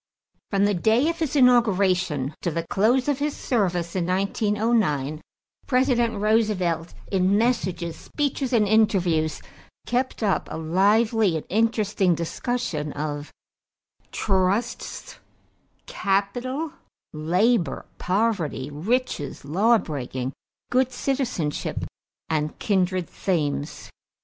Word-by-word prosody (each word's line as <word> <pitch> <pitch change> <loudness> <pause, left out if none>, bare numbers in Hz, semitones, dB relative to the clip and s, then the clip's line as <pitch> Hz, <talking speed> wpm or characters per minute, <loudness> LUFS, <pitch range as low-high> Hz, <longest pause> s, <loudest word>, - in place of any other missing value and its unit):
= - - -48
From 200 0 +2
the 205 - +2
day 220 - +3
of 335 - -3
his 310 -3 -1
inauguration 190 - +3
to - - 0
the 165 +1 -3
close 235 +9 +2
of 290 -2 +1
his 295 0 -1
service 180 -8 -1
in 175 -2 0
1909, 195 - 0 0.5
President 250 -4 +2
Roosevelt, 200 -6 +1 0.2
in 190 +1 +3
messages, 190 -8 0
speeches, 280 -3 -2
and 220 -4 +3
interviews, 180 -7 +2 0.4
kept 245 +1 -1
up 200 -3 +1
a - - -5
lively 200 +3 +2
and 155 - -7
interesting 210 -4 +2
discussion 170 - -3
of 145 0 -4 0.8
trusts, 195 +4 -1 0.7
capital, 255 - -1 0.4
labor, 180 +6 +1
poverty, 180 - 0
riches, 170 - -2
lawbreaking, 145 - 0 0.4
good 255 0 +2
citizenship, 250 - -2 0.4
and 155 -1 -1
kindred 185 -3 0
themes. 150 -4 -2
200 Hz, 100 wpm, -24 LUFS, 165-235 Hz, 0.8 s, day